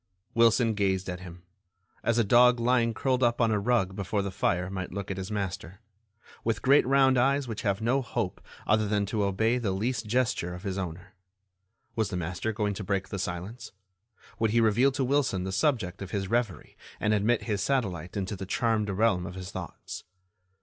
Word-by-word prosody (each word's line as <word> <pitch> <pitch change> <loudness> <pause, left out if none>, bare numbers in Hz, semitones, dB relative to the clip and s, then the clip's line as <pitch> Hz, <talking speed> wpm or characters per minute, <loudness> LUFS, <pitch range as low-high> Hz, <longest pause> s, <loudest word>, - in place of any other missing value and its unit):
Wilson 115 0 +4
gazed 95 -2 0
at 90 - -6
him, 90 -1 -11 0.6
as 115 0 +1
a 115 - +4
dog 120 +3 +5
lying 120 -1 +2
curled 130 +2 0
up 120 -1 +2
on 115 -2 +3
a 105 - +2
rug 100 -4 +1
before 100 +1 -1
the 100 - -3
fire 90 -1 0
might 95 -1 -5
look 100 +1 -4
at 95 - -4
his 95 +1 -5
master, 95 -3 -4 0.6
with 115 -1 -1
great 135 0 +5
round 135 -1 +4
eyes 135 +1 +2
which 110 -2 -4
have 100 0 0
no 130 +4 +2
hope 125 - -3 0.2
other 110 0 +2
than 100 0 +1
to 105 +1 -1
obey 110 +5 +1
the 115 -5 -1
least 110 +5 -1
gesture 110 -7 0
of 90 - -10
his 95 -3 -3
owner. 95 0 -6 0.8
Was 110 -2 0
the 90 - -3
master 90 +5 -2
going 105 -1 -1
to 100 - -6
break 100 0 -1
the 100 - -4
silence? 95 +8 -5 0.7
Would 110 -1 +2
he 115 +3 +3
reveal 115 +5 +4
to 135 - 0
Wilson 130 -8 +1
the 95 - -3
subject 100 - 0
of 95 - -5
his 95 -1 -2
reverie 115 -2 -2 0.2
and 105 - +1
admit 110 +3 +2
his 105 -4 -1
satellite 95 - -1
into 100 +1 -2
the 95 0 -7
charmed 110 0 +1
realm 100 -3 +1
of 90 - -8
his 95 0 -7
thoughts? - - -7
105 Hz, 200 wpm, -28 LUFS, 95-120 Hz, 0.8 s, dog